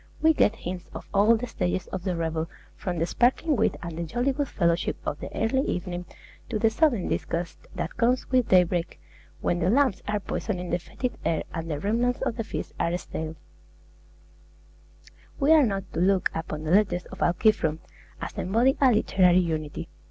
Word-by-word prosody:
We 320 +1 +5
get 225 -7 +3
hints 180 -3 -6
of - - -7
all 210 +4 +5
the 240 - -4
stages 90 - -2
of - - -4
the 185 -2 0
revel, 165 0 -2 0.3
from 180 -3 -4
the 165 - +1
sparkling 260 - +2
wit 220 -3 +1
and 170 -2 -5
the 170 - -3
jolly 240 - 0
good 280 +1 -1
fellowship 170 -5 0
of 145 - -2
the - - -6
early 230 +4 +2
evening, 175 0 -3 0.4
to 230 - -1
the 220 +1 +3
sodden 245 - +2
disgust 170 0 -3
that 165 - -4
comes 245 +2 +2
with 255 -3 +3
daybreak 180 -2 +3 0.4
when 175 - 0
the 175 +1 +2
lamps 260 -2 +3
are 210 0 0
poisoning 180 -2 -3
the 175 - +1
fetid 250 +8 -5
air 160 - 0
and 165 0 -4
the 150 -2 -2
remnants 235 +7 +1
of 230 - -1
the 225 - -2
feast 220 - -5
are 170 +1 +1
stale. 160 -2 -6 2.0
We 285 +2 +3
are 305 -5 +7
not 195 -2 -2
to - - -2
look 190 +1 +3
upon 160 -1 -4
the 155 - -2
letters 190 -2 +3
of 190 - -9
Alciphron 175 -3 +2 0.4
as - - -5
embodying 235 +8 +2
a 265 -2 +6
literary 185 -5 +4
unity. 155 -4 -1
190 Hz, 185 wpm, -26 LUFS, 170-235 Hz, 2.0 s, are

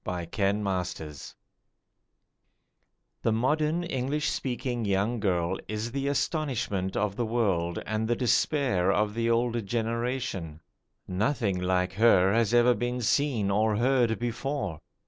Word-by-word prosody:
THE 90 -2 -4
YOUNGER 100 +1 +1
BORN 90 -5 -3 2.1
The 115 - +1
modern 150 +8 +1
English 150 -1 -1
speaking 120 -2 -3
young 100 +4 0
girl 90 -3 0
is 110 +2 -3
the 140 +2 -2
astonishment 130 - -1
of 100 -1 0
the 120 - -1
world 95 -7 0
and 110 0 -1
the 120 - +1
despair 120 - +2
of 105 +1 +1
the 115 +1 0
older 120 0 +1
generation. 115 -6 -3 0.5
Nothing 100 0 0
like 90 0 0
her 95 -3 +4
has 115 -1 +2
ever 120 +1 +5
been 120 +2 -2
seen 115 -5 +1
or 105 +1 +2
heard 120 -2 +2
before. 120 - -3
115 Hz, 125 wpm, -28 LUFS, 95-125 Hz, 2.1 s, ever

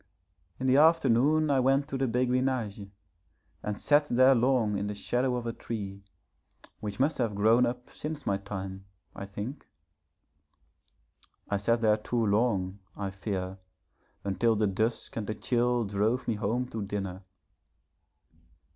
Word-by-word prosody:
In 130 - -3
the 130 +1 +4
afternoon 155 -1 +4
I 135 - +3
went 135 +2 +2
to - - -3
the 135 0 0
Béguinage, 125 -4 0 0.7
and 105 -1 -4
sat 145 0 +4
there 130 +1 +5
long 120 -4 +2
in 100 +1 -2
the 105 - -4
shadow 125 +5 0
of 120 -1 -3
a 115 - -2
tree, 100 -5 -6 0.8
which 105 -2 -5
must 145 +3 +1
have 115 -4 0
grown 115 +4 +4
up 125 +1 -5
since 150 -2 -6
my 100 - +1
time, 95 -1 -6 0.3
I 100 - -6
think. 105 +8 -7 1.8
I 100 - +2
sat 115 +4 +1
there 110 -1 +4
too 115 +2 -1
long, 100 -3 +1 0.2
I 100 -2 -3
fear, 95 -1 -4 0.6
until 100 +4 +1
the 105 0 +2
dusk 110 +4 -1
and 105 -3 -3
the 110 - -2
chill 120 +1 +1
drove 105 +5 0
me 115 - +2
home 110 +4 -1
to 110 - -4
dinner. 100 -2 -4
115 Hz, 145 wpm, -29 LUFS, 100-125 Hz, 1.8 s, there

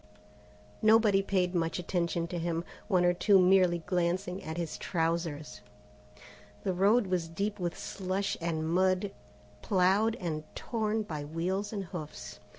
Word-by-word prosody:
Nobody 215 -2 +5
paid 185 -2 0
much 165 -2 0
attention 170 -1 -1
to 175 -1 -3
him, 165 0 -1 0.2
one 185 -4 +3
or 175 - +4
two 195 +3 +4
merely 180 -2 +4
glancing 180 +1 -1
at 160 +1 -5
his 170 -2 -4
trousers. 165 -3 -2 1.0
The 190 - 0
road 205 +6 +4
was 180 -3 -1
deep 200 +5 -3
with 175 -2 -2
slush 190 +1 -2
and 160 -1 -1
mud 185 +3 +2 0.5
ploughed 200 +4 +2
and 155 -4 -3
torn 220 -2 -1
by 155 -7 -5
wheels 180 +7 -2
and 205 -3 -3
hoofs. 160 -4 -8
180 Hz, 140 wpm, -30 LUFS, 170-195 Hz, 1.0 s, Nobody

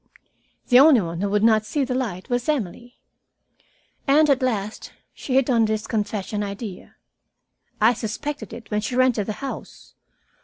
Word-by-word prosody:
The 250 -1 +7
only 280 -2 +7
one 170 -1 -5
who 200 - 0
would 210 +1 +1
not 220 -1 +4
see 275 +7 -1
the 255 - -3
light 220 -8 -3
was 245 +1 -1
Emily. 245 - -3 1.1
And 295 +2 +5
at 270 -1 +2
last 215 -5 -2 0.2
she 260 - -4
hit 270 -2 +3
on 235 -4 +3
this 215 -1 -2
confession 210 -1 -2
idea. 200 -1 -7 0.8
I 220 +3 +5
suspected 250 +7 -5
it 230 -2 -11
when 210 0 0
she 225 +4 -3
rented 250 -5 +2
the 215 - -2
house. 270 - -8
225 Hz, 160 wpm, -23 LUFS, 210-255 Hz, 1.1 s, The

